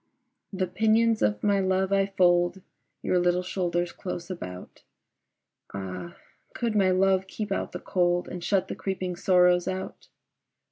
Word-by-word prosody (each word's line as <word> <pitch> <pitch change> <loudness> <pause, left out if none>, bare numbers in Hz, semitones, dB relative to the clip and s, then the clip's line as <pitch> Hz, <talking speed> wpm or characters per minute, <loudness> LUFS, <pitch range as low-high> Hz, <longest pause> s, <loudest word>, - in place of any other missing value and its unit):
The 190 -2 -1
pinions 220 +4 +2
of 105 0 +1
my 200 -1 +3
love 190 0 +1
I 195 0 +3
fold 180 -1 +2 0.4
Your 180 - +2
little 180 +1 +2
shoulders 175 -2 -1
close 175 -1 -6
about: 90 - -8 0.9
Ah 90 -3 -6 0.4
could 230 -2 -1
my 195 -2 +4
love 190 0 +2
keep 210 +1 -5
out - - -2
the - - -6
cold 175 -1 0
And 180 -1 -7
shut 190 0 +1
the - - -4
creeping 185 -2 -3
sorrows 180 0 +3
out! 190 0 -5
185 Hz, 145 wpm, -27 LUFS, 175-195 Hz, 0.9 s, my